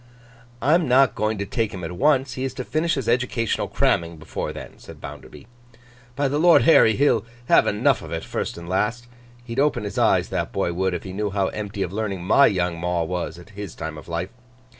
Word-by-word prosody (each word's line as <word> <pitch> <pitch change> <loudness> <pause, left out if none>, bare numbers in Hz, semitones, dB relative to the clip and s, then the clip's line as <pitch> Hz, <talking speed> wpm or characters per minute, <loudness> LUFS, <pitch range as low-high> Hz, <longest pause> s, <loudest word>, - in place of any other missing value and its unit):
'I'm 160 +4 +3
not 130 -2 +5
going 110 +1 -1
to 100 - -3
take 110 +2 -1
him 90 -2 -7
at 85 - -4
once; 135 +6 +2
he 130 - -4
is 135 -1 -3
to 130 - -4
finish 160 +5 0
his 135 -5 -3
educational 120 -2 0
cramming 85 -1 0
before 80 0 -5
then,' - - -10
said - - -12
Bounderby. - - -10 0.7
'By 140 +1 +1
the 145 +2 -1
Lord 170 +1 +6
Harry, 110 -9 +6
he'll 130 -6 +3 0.3
have - - +5
enough 120 +6 +2
of 80 - -9
it, 80 -1 -3
first - - -4
and 85 0 -9
last! 105 +6 -1 0.4
He'd 120 +1 -4
open 140 -5 +2
his 100 - -4
eyes, - - +3
that - - -2
boy 85 - -1
would, 95 +1 0
if 85 - -5
he 95 - -7
knew 105 +1 -2
how 100 -1 0
empty 105 -1 -4
of 90 - -5
learning 100 -4 -3
my 110 +9 +5
young 90 -3 -1
maw 85 0 0
was, 85 -1 -4
at 90 +5 -14
his 100 -3 -8
time 80 -1 -5
of 75 - -11
life. 85 +2 -3
105 Hz, 220 wpm, -23 LUFS, 90-130 Hz, 0.7 s, Lord